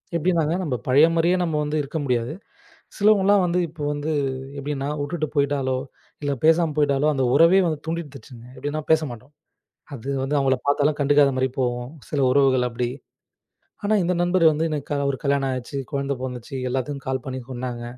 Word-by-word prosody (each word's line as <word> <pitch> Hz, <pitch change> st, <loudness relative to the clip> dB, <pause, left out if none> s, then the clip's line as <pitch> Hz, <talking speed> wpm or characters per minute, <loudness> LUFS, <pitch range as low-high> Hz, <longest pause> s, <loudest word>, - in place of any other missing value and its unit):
எப்டின்னாங்க 165 Hz, -2 st, +1 dB
நம்ப 145 Hz, -7 st, -1 dB
பழைய 140 Hz, +5 st, +6 dB
மாரியே 170 Hz, +2 st, +3 dB
நம்ம 160 Hz, -3 st, -1 dB
வந்து 150 Hz, +1 st, -2 dB
இருக்க 145 Hz, +3 st, -5 dB
முடியாது. 125 Hz, 0 st, -1 dB, 0.6 s
சிலவங்கலாம் 205 Hz, -2 st, +4 dB
வந்து 175 Hz, +1 st, 0 dB
இப்போ 155 Hz, -1 st, -9 dB
வந்து 145 Hz, +2 st, -3 dB, 0.5 s
எப்டின்னா 140 Hz, 0 st, -3 dB
வுட்டுட்டு 155 Hz, +2 st, -2 dB
போயிட்டாலோ, 140 Hz, -3 st, +1 dB, 0.4 s
இல்ல 145 Hz, -1 st, 0 dB
பேசாம 165 Hz, 0 st, +4 dB
போயிட்டாலோ, 145 Hz, -1 st, +2 dB
அந்த 135 Hz, -2 st, +1 dB
உறவே 170 Hz, +3 st, +6 dB
வந்து 155 Hz, -3 st, -1 dB
துண்டித்துடுச்சுங்க. 145 Hz, -7 st, -7 dB
எப்டினா 145 Hz, +4 st, -3 dB
பேசமாட்டோம். 140 Hz, -5 st, 0 dB, 0.6 s
அது 135 Hz, +1 st, -7 dB
வந்து 145 Hz, +2 st, -1 dB
அவங்கள 135 Hz, -1 st, +3 dB
பார்த்தாலும் 145 Hz, +1 st, +2 dB
கண்டுக்காத 145 Hz, 0 st, +4 dB
மாரி 130 Hz, -, +2 dB
போவோம். 125 Hz, 0 st, -2 dB, 0.2 s
சில 145 Hz, -, -1 dB
உறவுகள் 130 Hz, -2 st, +3 dB
அப்டி. 120 Hz, +1 st, -2 dB, 1.0 s
ஆனா 215 Hz, -, +2 dB
இந்த 180 Hz, +1 st, +1 dB
நண்பர் 175 Hz, 0 st, +2 dB
வந்து 155 Hz, +2 st, -1 dB
எனக்கு 150 Hz, -3 st, -4 dB
க -, -, +1 dB
1 135 Hz, -, -2 dB
கல்யாணம் 140 Hz, -1 st, +1 dB
ஆச்சு, 130 Hz, +2 st, -6 dB
குழந்தை 140 Hz, -1 st, -1 dB
பொண்ணு 130 Hz, -, -3 dB
வந்துச்சு, 125 Hz, +2 st, -8 dB
எல்லாத்துக்கும் 135 Hz, +2 st, -3 dB
கால் 130 Hz, -1 st, -2 dB
பண்ணி 130 Hz, -1 st, -4 dB
சொன்னாங்க. 120 Hz, -1 st, -5 dB
145 Hz, 165 wpm, -23 LUFS, 130-160 Hz, 1.0 s, பழைய